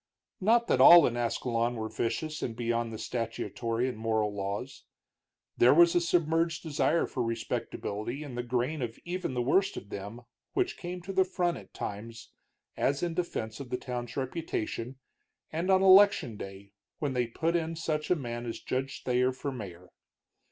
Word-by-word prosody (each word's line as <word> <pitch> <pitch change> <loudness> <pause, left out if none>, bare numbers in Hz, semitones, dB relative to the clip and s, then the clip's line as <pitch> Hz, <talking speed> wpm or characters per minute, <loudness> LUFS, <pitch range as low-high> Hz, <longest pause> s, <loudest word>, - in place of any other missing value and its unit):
Not 230 +4 +4
that - - +2
all 170 -2 +10
in 120 - 0
Ascalon 120 0 0
were 110 -1 -3
vicious 135 +8 -3
and 115 - -3
beyond 115 0 -1
the 110 - -6
statutory 115 +1 -2
and 125 -4 -5
moral 110 -2 0
laws. 100 +7 -5 0.7
There 125 +4 +6
was 170 +1 +7
a 175 - +3
submerged 165 -1 +1
desire 160 +1 +1
for 130 - -4
respectability 115 +2 -3
in 140 -4 -8
the 120 - -2
grain 125 +5 -1
of 115 -2 -4
even 175 -6 -3
the 125 - 0
worst 190 +10 +2
of 100 - -8
them 105 +5 -7 0.3
which 375 -1 0
came 180 0 -6
to 195 +2 -5
the 190 0 +4
front 180 -2 -1
at - - -14
times, 115 +3 -6 0.5
as 140 +3 0
in 170 -1 -1
defense 115 -11 -3
of 135 -3 -7
the 125 - -1
town's 125 -1 -5
reputation, 130 -3 -3 0.6
and 170 +4 -2
on 190 0 +5
election 195 - +6
day, 100 0 -9 0.3
when 145 -3 -2
they 125 -2 0
put 165 +8 -1
in 165 -1 -1
such 155 -2 -2
a 180 - +4
man 120 -5 -5
as 115 - -4
Judge 135 +1 -3
Thayer 125 0 +2
for 135 +2 -4
mayor. 90 -8 -8
125 Hz, 175 wpm, -29 LUFS, 115-165 Hz, 0.7 s, all